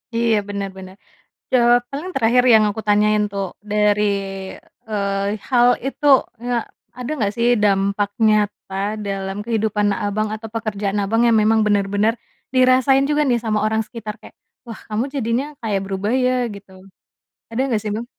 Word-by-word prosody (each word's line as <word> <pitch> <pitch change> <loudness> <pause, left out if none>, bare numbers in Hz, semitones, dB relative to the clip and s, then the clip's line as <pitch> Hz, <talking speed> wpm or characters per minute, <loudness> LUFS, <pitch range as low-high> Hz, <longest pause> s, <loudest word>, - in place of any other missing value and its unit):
Iya 230 -1 +2
bener 200 -1 -3
bener, 190 0 -10 0.6
jawaban 245 +4 +2
terakhir 250 -1 +3
yang 220 -1 +6
aku 205 +2 -4
tanyain 210 0 +3
tuh, 200 -1 -3 0.2
dari, 210 0 +2 0.9
eee, 200 0 -1
hal, 245 -2 +4 0.2
itu 275 +2 -3 0.3
kayak, 240 -1 -2 0.3
ada 250 +1 -5
nggak 205 -7 -1
sih 235 0 +1 0.2
dampak 200 0 +1 0.2
nyata 210 -2 0 0.3
dalam 195 0 -4
kehidupan 220 -2 0
Abang 215 0 -2
atau 220 +1 -8
pekerjaan 210 -2 -2
Abang 225 +4 +1
yang 230 - +4
memang 220 +1 +3
bener-bener 205 +1 +1 0.4
dirasain 255 +1 +4
juga 300 0 +2
nih 245 - +3
sama 215 -1 0
orang 220 +1 0
sekitar 215 -2 -7
kayak, - - -14 0.3
"Wah 230 -2 -9
kamu 220 +2 -1
jadinya 240 -1 0 0.2
kayak 210 -4 -1
berubah 195 +3 -2
ya?" 255 - +3 0.2
Gitu. 200 -1 -13 0.8
Ada 230 +2 -3
nggak 230 -5 0
sih 215 - -4
Bang? 230 - -4
215 Hz, 150 wpm, -20 LUFS, 205-235 Hz, 0.9 s, yang